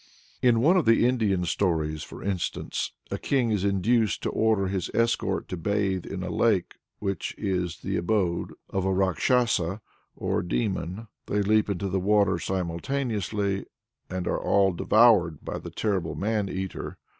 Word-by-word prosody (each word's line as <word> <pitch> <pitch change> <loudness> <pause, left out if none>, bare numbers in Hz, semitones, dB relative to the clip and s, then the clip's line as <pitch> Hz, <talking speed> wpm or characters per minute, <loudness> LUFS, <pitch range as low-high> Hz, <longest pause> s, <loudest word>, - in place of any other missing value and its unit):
In 120 -3 +4
one 170 +8 +5
of 175 - +2
the 115 +1 +5
Indian 105 -8 +1
stories, 80 -4 0
for - - -9
instance, 95 -3 -2 0.2
a - - -2
king 125 -5 +1
is 105 -3 0
induced 100 0 +1
to - - -1
order 110 -3 +2
his 95 -2 -2
escort 115 0 +1
to 90 - -4
bathe 95 0 -1
in 95 -2 -5
a 90 - -4
lake 105 -7 +1 0.2
which 100 -4 -3
is 90 -3 -2
the - - -2
abode 85 -1 0 0.2
of 95 - -1
a - - 0
Rákshasa 95 0 +1 0.4
or - - -1
demon. 95 +2 -2 0.2
They 105 0 +1
leap 105 +1 +3
into 100 0 -2
the 95 0 0
water 100 -2 +3
simultaneously, 100 - -2 0.4
and 90 -1 -3
are - - 0
all 100 -1 +3
devoured 95 -6 +4
by - - -4
the - - -8
terrible 95 -7 -1
man 105 -1 -1
eater. 95 0 -5
100 Hz, 155 wpm, -26 LUFS, 90-110 Hz, 0.4 s, one